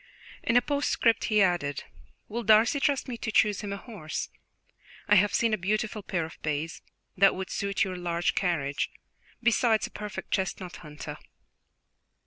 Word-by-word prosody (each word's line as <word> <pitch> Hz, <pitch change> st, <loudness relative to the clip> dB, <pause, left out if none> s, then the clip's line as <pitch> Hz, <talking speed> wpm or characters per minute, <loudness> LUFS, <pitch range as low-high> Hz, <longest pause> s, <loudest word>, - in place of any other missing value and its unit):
In 230 Hz, -, +3 dB
a 245 Hz, -, +4 dB
postscript 285 Hz, -5 st, +1 dB
he 215 Hz, -2 st, +4 dB
added: 175 Hz, -6 st, 0 dB, 0.4 s
"Will 235 Hz, +3 st, -3 dB
Darcy 220 Hz, +5 st, +5 dB
trust 280 Hz, -1 st, +1 dB
me 245 Hz, -2 st, -4 dB
to 225 Hz, -, -3 dB
choose 210 Hz, -1 st, +3 dB
him 205 Hz, -2 st, -5 dB
a 200 Hz, -, -3 dB
horse? 195 Hz, -9 st, -5 dB, 0.8 s
I -, -, +4 dB
have 205 Hz, 0 st, +5 dB
seen 230 Hz, -2 st, +2 dB
a 215 Hz, -, +1 dB
beautiful 210 Hz, +3 st, -1 dB
pair 175 Hz, -4 st, -2 dB
of 160 Hz, -, -12 dB
bays, 155 Hz, +1 st, -3 dB, 0.3 s
that 195 Hz, +1 st, +5 dB
would 190 Hz, 0 st, -5 dB
suit 200 Hz, +1 st, 0 dB
your 190 Hz, -2 st, -3 dB
large 175 Hz, -1 st, 0 dB
carriage, 150 Hz, -7 st, 0 dB, 0.5 s
besides 230 Hz, -1 st, +3 dB
a -, -, -9 dB
perfect 205 Hz, -3 st, -7 dB
chestnut 190 Hz, -2 st, -2 dB
hunter." 150 Hz, -2 st, -8 dB
200 Hz, 160 wpm, -28 LUFS, 175-220 Hz, 0.8 s, Darcy